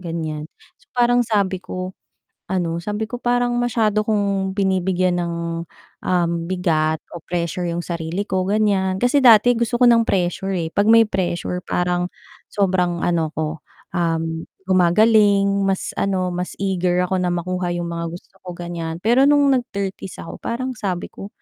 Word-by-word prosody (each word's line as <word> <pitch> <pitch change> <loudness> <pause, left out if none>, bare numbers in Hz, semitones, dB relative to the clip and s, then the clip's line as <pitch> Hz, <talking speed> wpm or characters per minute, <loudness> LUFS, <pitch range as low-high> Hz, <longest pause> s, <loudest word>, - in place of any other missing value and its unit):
ganyan. 160 -3 -4 0.3
So - - -28
parang 245 0 +4
sabi 200 -5 0
ko, 185 0 -6 0.6
ano, 170 -3 -1
sabi 210 +3 -2
ko 245 +2 -7
parang 245 0 +1
masyado 220 -3 +1
kung 200 -3 0
binibigyan 185 -2 +1
ng, 170 -1 -3 0.7
um, 175 -2 +1 0.2
bigat 160 -4 +1 0.2
o 170 - -6
pressure 175 0 -2
'yung 170 +1 -3
sarili 170 +3 -3
ko, 185 -1 0
ganyan. 200 -3 +1
Kasi 245 +5 +3
dati 240 0 +7
gusto 235 +1 0
ko 250 - +4
ng 235 -1 +6
pressure, 190 +1 0
eh. 165 -1 -3
'Pag 205 +2 +2
may 230 0 +7
pressure 180 -2 -2
parang 180 0 -1 0.4
sobrang 180 -3 +1
ano 165 -2 +1
ko, 155 0 -3 0.3
um, 165 -1 -1 0.2
gumagaling, 200 +3 +4 0.2
mas 190 -1 -1
ano, 185 -2 0
mas 180 +1 -4
eager 180 -2 0
ako 185 0 -1
na 180 - 0
makuha 180 +1 -2
'yung 175 0 -2
mga 170 0 -3
gusto - - -17
ko, 185 - -13
ganyan. 170 -2 -5
Pero 260 +5 +5
no'ng 285 -1 +4
nag - - -13
30s 195 -2 -5
ako, - - -9
parang 255 +2 -3
sabi 190 -6 -4
ko, 195 - -8
185 Hz, 160 wpm, -21 LUFS, 175-210 Hz, 0.7 s, dati